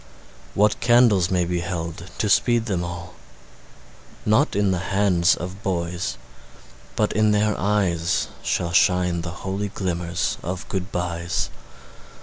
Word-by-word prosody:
What 105 +1 +3
candles 115 -7 +4
may 90 -2 +1
be 90 0 -1
held 85 0 -5
to 105 - 0
speed 120 +2 +3
them 95 -6 -1
all? 85 0 -6 1.1
Not 110 +8 +3
in 100 -1 +2
the 90 - 0
hands 95 -2 +2
of 90 +3 -7
boys, 90 -2 -2 0.8
but - - +1
in 110 0 +3
their 105 0 +2
eyes 95 -4 +1
Shall 85 -1 -1
shine 90 -2 +3
the 85 - -5 0.2
holy 100 +2 -2
glimmers 90 -3 -2
of 95 +6 -5
good 95 -1 -3
byes. 85 -1 -2
90 Hz, 130 wpm, -23 LUFS, 85-105 Hz, 1.1 s, candles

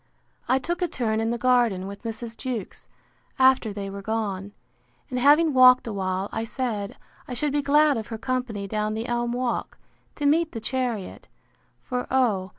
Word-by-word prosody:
I 260 - +4
took 345 +7 -2
a 355 - +2
turn 220 -8 -1
in 225 - 0
the 235 - -1
garden 240 -6 +2
with 200 +1 -8
Mrs. 230 0 -6
Jewkes, 240 -7 -6 0.5
after 260 -4 +4
they 200 -1 -5
were 200 0 -6
gone: 205 -2 -3 0.6
And 250 - -1
having 295 +4 +5
walked 255 -1 +7
a 225 - -4
while, 190 0 -2
I 225 - -2
said, 225 -4 -3 0.3
I 250 - -5
should 290 +4 0
be 290 - +2
glad 290 0 +4
of 220 - -5
her 225 - -5
company 250 -4 -3
down 215 +1 -1
the 225 +1 -3
elm 240 0 -1
walk, 245 0 -2 0.4
to 290 - -3
meet 320 +3 +3
the 230 - -4
chariot: 235 -3 -3 0.6
For, 250 0 -3
O! 220 -8 +2
240 Hz, 180 wpm, -25 LUFS, 215-260 Hz, 0.6 s, walked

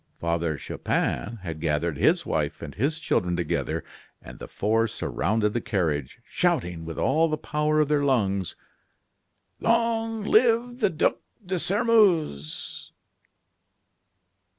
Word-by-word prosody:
Father 85 -2 -1
Chupin 115 - -2
had 80 -3 -5
gathered 80 0 0
his - - +2
wife - - -2
and - - -7
his 145 +8 0
children 90 - 0
together, 85 -1 -2 0.4
and - - -12
the - - -8
four 115 +2 +1
surrounded 105 +1 -1
the 120 - -1
carriage, 80 - -2
shouting, 85 -2 -1
with 80 0 -6
all 160 +4 +2
the 155 - -1
power 150 +1 0
of 150 - +2
their 150 -1 +2
lungs: 100 -9 +1 1.0
"Long 225 -1 +1
live 235 +3 +3
the 220 - +3
Duc 160 -3 +1 0.3
de 185 0 -1
Sairmeuse!" 190 - +1
120 Hz, 125 wpm, -26 LUFS, -, 1.0 s, live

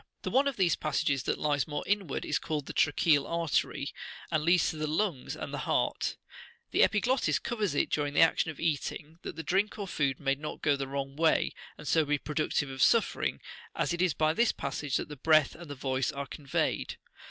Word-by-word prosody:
The - - -3
one 275 +2 +4
of 280 - -1
these 180 -5 +3
passages 145 -2 0
that - - 0
lies 145 -3 0
more 145 -1 -3
inward 195 -8 -1
is 150 - 0
called 150 -3 -3
the - - -7
[tracheal] 145 -1 +3
artery, 170 -3 -1 0.4
and 155 - +2
Leads 170 +2 +4
to 155 - -8
the 155 0 -2
lungs 160 -3 -1
and - - -6
the - - -3
heart: - - 0 0.5
the - - +3
epiglottis 245 +5 +3
covers 215 - -2
it - - +1
during 145 -1 -1
the - - +5
action 165 0 +4
of 155 - -7
eating, 160 0 -2
that - - -6
the 160 - -5
drink 200 +6 0
or 200 -2 -4
food 140 -6 0
may 135 -2 +1
not 150 +2 -7
go 145 -1 +4
the 135 -1 -4
wrong 135 0 -4
way, 160 +1 +2 0.2
and 150 - -10
so 160 +4 +4
be 145 0 +1
productive 150 -1 -1
of 135 0 -5
suffering, 230 - +2 0.3
as - - 0
it 175 - -2
is 185 -4 +2
by 155 0 +2
this 235 +7 +3
passage 140 0 -3
that - - -4
the 150 - -8
breath 155 +1 +4
and 170 -1 -11
the 145 - -5
voice 130 -2 -1
are 140 0 -4
conveyed. 140 -1 -2
155 Hz, 215 wpm, -30 LUFS, 140-170 Hz, 0.5 s, the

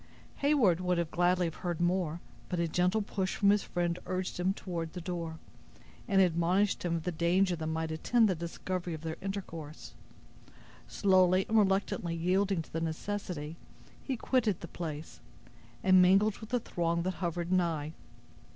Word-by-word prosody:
Heyward 265 - +3
would 180 -3 0
gladly 180 +1 +2
have 165 - -4
heard 175 -3 -2
more, 175 -2 0 0.3
but 180 - -1
a 170 - +1
gentle 180 +6 +1
push 190 -2 -2
from 200 -1 +4
his 205 0 +3
friend 175 -1 -2
urged 185 -1 -3
him 185 +2 +2
toward 170 -5 -5
the 180 - -5
door, 170 -2 -4 0.7
and 195 -3 +3
admonished 180 +3 +2
him 170 -1 -1
of 165 - -3
the 180 - -1
danger 175 +3 +2
that 160 -1 -4
might 160 0 -2
attend 225 +8 +3
the 190 - +2
discovery 175 +1 -4
of 155 - -9
their 160 0 -4
intercourse. 170 -6 -6 0.9
Slowly 185 -1 +3
and 220 - -1
reluctantly 195 -4 +2
yielding 185 +1 +1
to - - -20
the 165 - -2
necessity, 165 -2 -4 0.5
he 265 -3 -2
quitted 225 -5 +1
the 170 - -6
place, 155 -2 -6 0.6
and 185 -2 +6
mingled 195 +3 +4
with 220 - -10
the 245 - +1
throng 170 -5 -1
that 185 +1 -1
hovered 175 0 -2
nigh. 165 -4 0
180 Hz, 165 wpm, -31 LUFS, 165-195 Hz, 0.9 s, and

